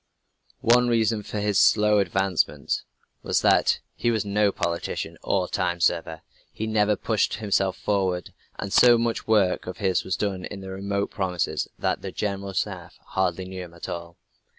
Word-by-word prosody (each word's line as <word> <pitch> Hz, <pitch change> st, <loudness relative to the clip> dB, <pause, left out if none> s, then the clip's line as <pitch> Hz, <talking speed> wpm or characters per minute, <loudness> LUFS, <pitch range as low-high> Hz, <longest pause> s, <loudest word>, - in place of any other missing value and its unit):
One 125 Hz, +1 st, +4 dB
reason 115 Hz, -2 st, +2 dB
for 105 Hz, +1 st, -5 dB
his 105 Hz, -1 st, +2 dB
slow 105 Hz, -1 st, +5 dB
advancement 95 Hz, -2 st, 0 dB, 0.4 s
was -, -, +1 dB
that -, -, +3 dB
he 120 Hz, -, -1 dB
was 110 Hz, -3 st, 0 dB
no 100 Hz, 0 st, +2 dB
politician 85 Hz, -2 st, -3 dB
or 95 Hz, -2 st, 0 dB
time 90 Hz, -2 st, -1 dB
server. 80 Hz, -1 st, 0 dB, 0.3 s
He 110 Hz, -, -4 dB
never 105 Hz, -1 st, +2 dB
pushed -, -, 0 dB
himself 100 Hz, -3 st, 0 dB
forward. 95 Hz, -3 st, -1 dB, 0.2 s
And 100 Hz, -1 st, -5 dB
so 120 Hz, -1 st, +7 dB
much 115 Hz, 0 st, 0 dB
of 95 Hz, -4 st, +1 dB
his 95 Hz, -1 st, +1 dB
work -, -, -5 dB
was 95 Hz, -, -1 dB
done 95 Hz, -3 st, -2 dB
in 100 Hz, -2 st, -7 dB
remote 100 Hz, +1 st, -3 dB
provinces 90 Hz, -4 st, -1 dB
that -, -, -1 dB
the -, -, -5 dB
General 100 Hz, -1 st, -3 dB
Staff -, -, -3 dB
hardly 95 Hz, -1 st, 0 dB
knew 95 Hz, 0 st, -6 dB
him 85 Hz, -1 st, -15 dB
at 85 Hz, -, -8 dB
all. 85 Hz, 0 st, -6 dB
100 Hz, 165 wpm, -25 LUFS, 90-105 Hz, 0.4 s, so